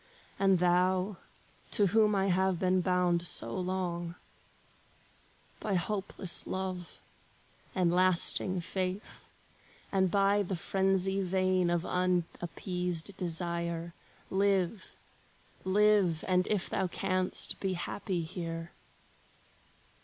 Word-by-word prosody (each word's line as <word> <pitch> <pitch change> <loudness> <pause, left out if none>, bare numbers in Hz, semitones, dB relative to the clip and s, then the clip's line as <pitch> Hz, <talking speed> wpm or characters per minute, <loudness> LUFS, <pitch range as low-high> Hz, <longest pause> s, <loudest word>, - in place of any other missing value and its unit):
And 195 -1 +4
thou, 180 +2 +2 0.5
to 205 - +2
whom 210 +2 +3
I 195 0 +2
have 190 0 +2
been 185 +1 +2
bound 180 -1 +1
so - - -1
long, 180 -2 -2 1.4
By 205 -3 -1
hopeless 190 0 -1
love, 185 -2 -4 0.8
and 180 -3 +2
lasting 185 0 +3
faith, 185 +3 -4 0.6
and 190 -1 +2
by 200 +2 +3
The 195 -1 -2
frenzy 195 +2 +1
vain 185 -1 +1
of 175 0 0
unappeased 180 0 -2
desire, 170 -1 -3 0.4
Live, 195 0 0 0.7
live, 195 -4 +3
and 185 -1 +2
if 205 -4 0
thou 190 - -1
canst, 185 0 0
be 190 -1 -1
happy 180 0 -3
here! 165 0 -5
185 Hz, 100 wpm, -31 LUFS, 175-195 Hz, 1.4 s, And